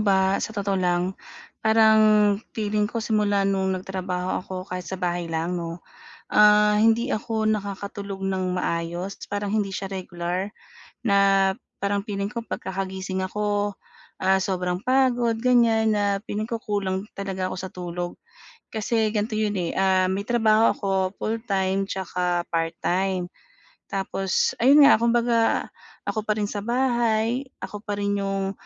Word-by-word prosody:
ba, 190 -1 +3
sa - - -3
totoo 200 -1 0
lang, 180 +1 +1 0.5
parang 220 0 +5 0.6
feeling 210 0 0
ko 230 - -3
simula 210 -3 +1
no'ng 190 -1 0
nagtrabaho 185 -1 -3
ako 190 - -8 0.2
kahit 180 -1 -4
sa 190 - -5
bahay 175 -1 -2
lang 165 +2 -1
'no, 170 -1 -4 0.5
ah, 210 0 +6
hindi 225 +4 +3
ako 220 0 -1
nakakatulog 200 -1 -4
nang 185 -1 -1
maayos. 175 +2 -3
Parang 205 0 -3
hindi 205 -2 0
siya 195 0 -5
regular, 185 +1 -4 0.5
na 195 -1 +4 0.3
parang 200 0 0
feeling 200 -2 -3
ko 230 +2 -5
'pag - - -5
kakagising 190 0 -3
ako, 205 +1 -1 0.5
ah, 190 0 +3
sobrang 180 -1 -1
pagod, 250 -3 +2
ganyan, 230 -3 +4
na 205 - +1 0.2
feeling 215 +1 -2
ko 230 -1 -3
kulang 200 -2 -2
talaga 190 -2 -3
ako - - -5
sa 190 0 -6
tulog. 175 0 -4 0.6
Kasi 220 0 +1
ganito 215 +1 -1
yun 210 -1 0
eh, 170 -2 -1
ah, 190 -1 +3
may 200 +2 -2
trabaho 225 -2 +4
ako 200 - -5 0.3
full-time 195 -4 -1
'tsaka 180 -2 -1
part-time. 175 +2 -1 0.6
Tapos, 195 -1 0
ayun 280 +5 +7
nga, 280 - +7
kumbaga, 235 0 +2 0.4
ako 220 - -2
pa 215 - +2
rin 210 - -1
sa 205 0 -3
bahay, 240 +1 +1 0.2
ako 210 - -6
pa 205 -1 -4
rin 200 0 -1
'yung 195 -1 -1
200 Hz, 145 wpm, -24 LUFS, 185-220 Hz, 0.6 s, ayun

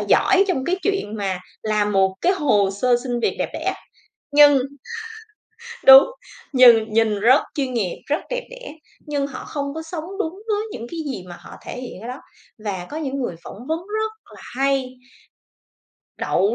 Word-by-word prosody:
giỏi 385 +1 +4
trong 265 -8 0
cái 365 - 0
chuyện 390 - -1
mà 195 -3 -2 0.2
làm 210 -1 0
một 190 -1 +3
cái 365 - +3
hồ 215 - +2
sơ 240 +5 +2
xin 245 -2 -2
việc - - 0
đẹp - - -1
đẽ, - - -2 0.6
nhưng 290 -1 +7 1.3
đúng, 270 0 +11 0.5
nhìn 235 -4 +6
nhìn 220 -2 +2
rất 250 +6 +6
chuyên 270 -5 -2
nghiệp, 200 -7 -2
rất 295 +2 +1
đẹp - - -2
đẽ, - - -9 0.3
nhưng 285 -2 -1
họ 275 -2 -8
không 280 -1 -4
có 320 - -5
sống 320 0 -6
đúng 325 -6 -1 0.2
với 420 -1 +1
những 230 - -7
cái 335 - -6
gì 185 -7 -7
mà 175 - -9
họ - - -12
thể - - -7
hiện 245 -7 -8
ở 230 - -7
đó. 250 +2 -6 0.5
Và 190 -4 -4
có 300 - -6
những 280 -4 -3
người 240 -9 -3
phỏng 235 +5 -10
vấn 320 +1 0
rất 435 +1 -2 0.2
là - - -13 0.2
hay, 275 -1 +1 1.3
đậu 200 +5 +1
265 Hz, 180 wpm, -21 LUFS, 215-315 Hz, 1.3 s, đúng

